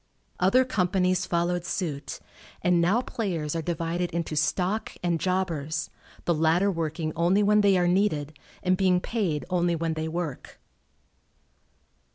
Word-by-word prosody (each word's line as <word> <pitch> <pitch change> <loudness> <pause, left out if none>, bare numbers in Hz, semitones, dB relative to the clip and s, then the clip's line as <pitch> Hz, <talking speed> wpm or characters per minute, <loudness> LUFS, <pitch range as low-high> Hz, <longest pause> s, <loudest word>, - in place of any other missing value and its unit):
Other 245 +8 +4
companies 185 -4 +1
followed 175 0 0
suit, 160 -6 -4 0.4
and 175 -1 +3
now 195 +8 +3
players 170 -12 -3
are 165 - -1
divided 170 +2 -2
into 165 -2 -3
"stock" 180 +7 0
and 170 -2 +1
"jobbers," 165 -5 -1 0.3
the 170 - +3
latter 165 +5 +2
working 160 -2 -3
only 180 +5 +3
when 210 +1 +4
they 200 -2 +4
are 175 -1 +2
needed 175 -6 +1 0.3
and 185 0 +3
being 185 -1 +3
paid 180 -8 -2
only 175 -1 +2
when 165 0 -1
they 160 0 -3
work. 160 -4 -5
175 Hz, 140 wpm, -26 LUFS, 160-185 Hz, 0.4 s, Other